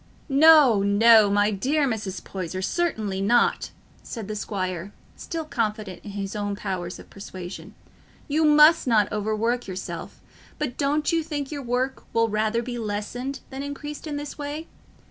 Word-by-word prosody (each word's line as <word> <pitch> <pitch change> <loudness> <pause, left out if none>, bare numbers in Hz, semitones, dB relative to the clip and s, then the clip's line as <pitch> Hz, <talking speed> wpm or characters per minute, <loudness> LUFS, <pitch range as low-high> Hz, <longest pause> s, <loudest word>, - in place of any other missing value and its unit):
"No, 285 -6 +7
no, 210 +1 +6
my 205 +1 +3
dear 275 +9 +1
Mrs. 205 -6 -4
Poyser, 185 0 -5
certainly 215 - -1
not," 235 +4 +2 0.3
said 225 -5 -7
the 215 - -4
squire, 185 -2 -4 0.2
still 325 -2 -5
confident 215 - -3
in 205 - -8
his 200 0 -4
own 205 -1 -2
powers 185 -3 -4
of - - -13
persuasion, 185 -1 -9 0.5
"you 305 +2 +1
must 300 0 +6
not 215 -4 +3
overwork 220 +3 -1
yourself; 185 -1 -6 0.4
but 285 -5 -3
don't 295 +2 +1
you 330 -1 +2
think 295 -3 -4
your 290 -2 -4
work 255 +1 -2
will 230 0 +2
rather 215 +2 0
be 240 0 -5
lessened 230 +6 -4
than 265 +1 -5
increased 295 +2 -6
in 295 - -3
this 290 +1 -6
way? 295 +3 -5
230 Hz, 155 wpm, -25 LUFS, 200-285 Hz, 0.5 s, No